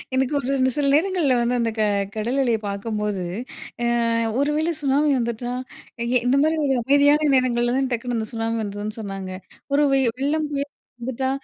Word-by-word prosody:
எனக்கு 265 +2 +1
ஒரு 270 -1 -4
இந்த 260 - +3
சில 285 -1 +1
நேரங்கள்ல 325 -5 +2
வந்து, 240 +1 +1
அந்த 230 -1 +1
க 220 - +1 0.3
கடல் 235 +5 -1
அலைய 235 -4 +2
பாக்கும்போது, 205 -1 -2 0.6
அ - - +1 0.5
"ஒருவேளை 300 +3 +1
சுனாமி 285 +2 +2
வந்துட்டா, 235 +1 -3 0.5
எங்க 235 - -1
இந்த 260 +3 +3
மாரி 315 +1 +2
ஒரு 270 - +2
அமைதியான 285 +3 +4
நேரங்கள்ல 240 -1 +2
தான் 270 -1 0
டக்குனு 240 0 -2
அந்த 220 - -2
சுனாமி 225 0 -1
வந்துதுன்னு 205 +1 -5
சொன்னாங்க, 195 -3 -5 0.4
ஒரு 290 - +4
வெள்ளம், 270 +4 +1
புயல் 285 0 -3 0.3
வந்துட்டா, 260 +2 -2
255 Hz, 165 wpm, -23 LUFS, 230-280 Hz, 0.6 s, அமைதியான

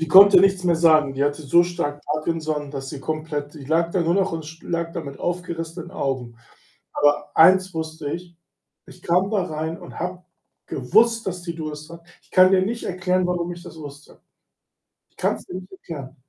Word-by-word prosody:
Die 160 - -1
konnte 195 +5 +9
nichts 195 -1 +3
mehr 175 -2 +2
sagen. 155 -4 +4
Die 140 +1 +1
hatte 145 +2 -1
so 170 +5 +4
stark 150 -5 -4
Parkinson, 155 -1 -2
dass 135 -1 -6
sie 140 0 -7
komplett 155 0 -4
die 145 -3 -10
lag 165 +4 +1
da 180 - 0
nur 170 +1 +2
noch 185 -4 0
sch 160 +2 -11
lag 170 -1 -3
da 170 - -4
mit 140 -3 -9
aufgerissenen 170 -1 -4
Augen. 125 -4 -3 0.6
Aber 145 0 +1
eins 185 +2 +6
wusste 160 -2 -4
ich, 175 0 -7 0.5
ich - - -15
kam 180 +3 +2
da 205 -3 +1
rein 160 -1 -4
und 175 - -11
habe 180 +1 -4 0.4
gewusst, 225 - +2
dass 180 -2 -4
sie 170 -1 -5
Durst 155 -1 -7
hat. 170 0 -12 0.2
Ich - - -31
kann 185 0 +6
dir 190 -1 +5
nicht 230 +5 -2
erklären, 185 0 0
warum 175 -1 -1
ich 175 0 -12
das - - -11
wusste. 145 -1 -11 0.9
Ich - - -40
kann's - - -1
dir - - -7
nicht 185 0 -8
erklären. 150 -8 -9
165 Hz, 195 wpm, -23 LUFS, 150-180 Hz, 0.9 s, konnte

